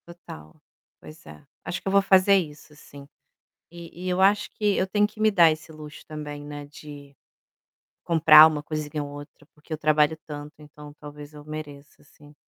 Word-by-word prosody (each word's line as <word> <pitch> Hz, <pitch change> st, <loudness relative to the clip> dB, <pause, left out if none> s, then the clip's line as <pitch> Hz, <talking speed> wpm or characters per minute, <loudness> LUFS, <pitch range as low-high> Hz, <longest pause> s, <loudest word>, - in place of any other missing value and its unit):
Total, 80 Hz, -, -13 dB, 0.4 s
pois 155 Hz, +1 st, -15 dB
é, -, -, -14 dB, 0.2 s
acho 175 Hz, -, -5 dB
que -, -, -10 dB
eu -, -, 0 dB
vou 200 Hz, 0 st, +4 dB
fazer 195 Hz, 0 st, +4 dB
isso 150 Hz, -4 st, -4 dB
sim. 140 Hz, -2 st, -15 dB, 0.6 s
E 170 Hz, 0 st, -13 dB
e -, -, -2 dB
eu 180 Hz, +1 st, -1 dB
acho 205 Hz, +2 st, +2 dB
que 210 Hz, -2 st, -1 dB
eu 185 Hz, -, 0 dB
tenho 205 Hz, +2 st, +1 dB
que 215 Hz, +1 st, -15 dB
me 215 Hz, 0 st, +3 dB
dar 170 Hz, -5 st, +5 dB
esse 155 Hz, +1 st, -7 dB
luxo 155 Hz, -1 st, -12 dB
também, 150 Hz, -1 st, -8 dB
né, 145 Hz, 0 st, -9 dB
de 145 Hz, -1 st, -13 dB, 0.9 s
comprar 160 Hz, -2 st, +7 dB
uma 150 Hz, -2 st, -4 dB
coisinha 150 Hz, 0 st, -5 dB
ou 145 Hz, -, -8 dB
outra 145 Hz, +1 st, -13 dB
porque 150 Hz, +2 st, -24 dB
eu 155 Hz, -, -2 dB
trabalho 155 Hz, 0 st, +1 dB
tanto 150 Hz, -1 st, -9 dB
então 150 Hz, 0 st, -14 dB
talvez 145 Hz, 0 st, -12 dB
eu 150 Hz, 0 st, -13 dB
mereça 150 Hz, -2 st, -10 dB
sim. 145 Hz, 0 st, -20 dB
150 Hz, 190 wpm, -24 LUFS, 145-170 Hz, 0.9 s, comprar